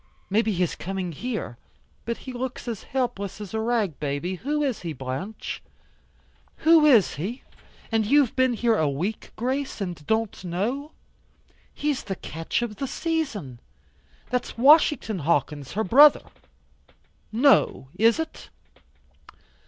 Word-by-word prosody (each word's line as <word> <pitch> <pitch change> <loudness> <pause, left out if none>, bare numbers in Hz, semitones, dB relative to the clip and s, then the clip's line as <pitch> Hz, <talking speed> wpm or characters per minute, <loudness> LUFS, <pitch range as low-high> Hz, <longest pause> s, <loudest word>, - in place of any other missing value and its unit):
Maybe 220 +2 +2
he 180 -2 +1
is 175 - -1
coming 185 -1 -4
here. 180 - -5 0.5
But 235 0 -2
he 260 - -6
looks 250 0 -5
as 225 -4 -4
helpless 240 -7 -3
as 205 -2 -8
a 220 - -1
rag 220 - 0
baby. 145 +5 -2
Who 295 - -1
is 265 -5 -1
he, 170 -3 -4
Blanche?" 135 - -5 1.0
"Who 320 -2 +7
is 230 - +5
he? 210 - -4 0.5
And 225 -1 +2
you've 270 +3 +3
been 260 -1 +3
here 230 0 +2
a 155 -2 +2
week, 180 +11 -3
Grace, 260 +4 -2
and 175 -6 -5
don't 220 -3 -1
know? 230 - -3 0.8
He's 295 -3 -2
the 195 -2 -3
catch 165 +7 -3
of 215 -4 -5
the 275 - -3
season. 265 - -3 0.7
That's 250 -1 -2
Washington 275 - +5
Hawkins 150 -3 -1
her 220 - 0
brother." 285 +9 +6 1.1
"No, 235 - +3
is 225 +4 +4
it?" 320 0 -6
220 Hz, 135 wpm, -25 LUFS, 180-260 Hz, 1.1 s, Who